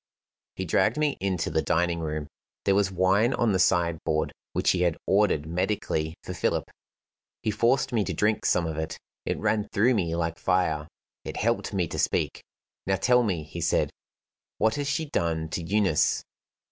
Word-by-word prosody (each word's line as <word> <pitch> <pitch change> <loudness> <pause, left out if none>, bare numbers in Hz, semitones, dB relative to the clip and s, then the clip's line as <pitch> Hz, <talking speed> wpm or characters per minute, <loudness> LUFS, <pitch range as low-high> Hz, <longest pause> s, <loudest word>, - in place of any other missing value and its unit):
He 95 - -3
dragged 95 - +2
me 150 -2 +1
into 95 -4 -1
the 80 - +2
dining 85 +3 +1
room. 75 -2 -3 0.4
There 100 - +4
was 100 -1 +2
wine 95 +7 +3
on 120 -2 +2
the 95 - +1
side 85 -3 +2
board, 80 0 0 0.2
which - - +2
he 90 - 0
had 85 -3 +2
ordered 95 -7 +2
medically 85 -2 -1
for - - -5
Philip. - - -1 0.7
He 110 - +1
forced 115 +5 +2
me 110 -3 +2
to - - -2
drink 105 +1 +1
some 85 - +2
of 80 -1 -3
it. 80 0 -4 0.3
It - - 0
ran 110 -1 0
through 120 +6 +3
me 85 -7 0
like 85 -1 -2
fire; 80 -5 +1 0.4
it - - -6
helped 115 +3 0
me 95 -4 0
to - - -4
speak. - - 0 0.4
"Now 95 - +3
tell 125 +6 +4
me," 95 -9 -1
he 75 - -7
said, - - +1 0.7
"what 110 +1 +2
has 145 +2 -2
she 145 +3 0
done 80 - -1
to 85 - -3
Eunice?" 90 -3 +2
95 Hz, 185 wpm, -27 LUFS, 80-110 Hz, 0.7 s, There